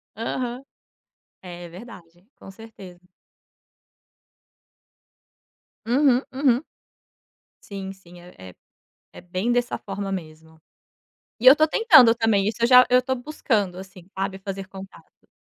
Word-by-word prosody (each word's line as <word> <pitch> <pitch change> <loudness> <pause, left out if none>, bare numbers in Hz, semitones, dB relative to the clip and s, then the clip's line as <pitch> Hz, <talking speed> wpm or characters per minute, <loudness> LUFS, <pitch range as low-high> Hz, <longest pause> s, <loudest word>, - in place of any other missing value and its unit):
Aham. 240 +3 -4 0.8
É, 175 -1 -10
é - - -9
verdade, 175 -2 -14
com - - -13
certeza. 195 -4 -14 2.9
Uhum, 255 +1 +2
uhum. 265 0 +1 1.0
Sim, 195 -1 -8
sim, 180 -2 -17
é 175 +1 -16
é 95 -1 -12 0.6
é - - -12
bem 185 +6 -3
dessa 245 0 -1
forma 195 0 -6
mesmo. 160 -3 -9 0.8
E 235 - -5
eu 260 - +11
estou 310 +2 +2
tentando 310 - +6
também, 225 -4 0
isso 225 +2 -4
eu 235 - +3
já 250 0 +7
eu 250 0 +5
estou 260 +1 -3
buscando, 225 -8 -2
assim, 190 -2 -12
sabe, 195 0 -3
fazer 195 0 -7
contato. 195 0 -15
200 Hz, 125 wpm, -23 LUFS, 185-245 Hz, 2.9 s, eu